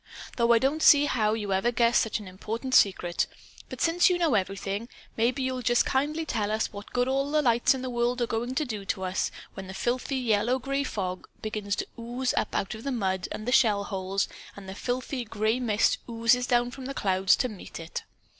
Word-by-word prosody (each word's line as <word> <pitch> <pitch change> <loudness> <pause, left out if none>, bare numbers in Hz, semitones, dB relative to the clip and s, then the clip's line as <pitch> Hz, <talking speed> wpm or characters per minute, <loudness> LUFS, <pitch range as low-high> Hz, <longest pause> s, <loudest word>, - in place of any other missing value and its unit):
Though 235 -1 +3
I 235 - +7
don't 275 +6 0
see 290 -1 +7
how 215 -6 +1
you 205 -3 -2
ever 195 +6 +2
guessed 235 -1 +3
such 220 - -1
an 205 - -10
important 225 +7 -5
secret. 180 -6 +3 0.4
But - - -7
since 350 +4 +4
you 360 - +2
know 335 -6 +2
everything, 195 +2 -2 0.3
maybe 250 +4 +1
you'll 260 -1 -2
just 240 0 +3
kindly 300 +4 0
tell 215 -8 -1
us 215 0 -1
what 200 0 -9
good 245 0 +1
all 275 +2 0
the 305 0 +2
lights 240 +1 +3
in 260 - -5
the 255 - -3
world 240 +1 0
are 240 - +2
going 235 +3 -3
to 305 - +1
do 215 -6 -5 0.2
us 185 0 -1 0.2
when 190 0 -8
the 190 - -8
filthy 250 +4 -1
yellow 240 0 +1
gray 275 +2 -1
fog 185 -8 -4 0.2
begins 210 -2 -2
to - - -3
ooze 245 +2 -2
up - - -1
out 195 - -1
of 220 +1 -9
the 275 - -2
mud 190 -6 -1
and 215 - -6
the - - +1
shell 215 -6 +4
holes, 195 0 -2 0.3
and 200 -1 -11
the 190 - -6
filthy 250 +4 -3
gray 220 +1 0
mist 220 -4 +2
oozes 235 +2 +2
down 240 0 +2
from 260 0 -9
the 275 +1 -5
clouds 190 -1 +3
to 255 - 0
meet 210 -7 -9
it. 165 0 -5
235 Hz, 220 wpm, -27 LUFS, 205-255 Hz, 0.4 s, I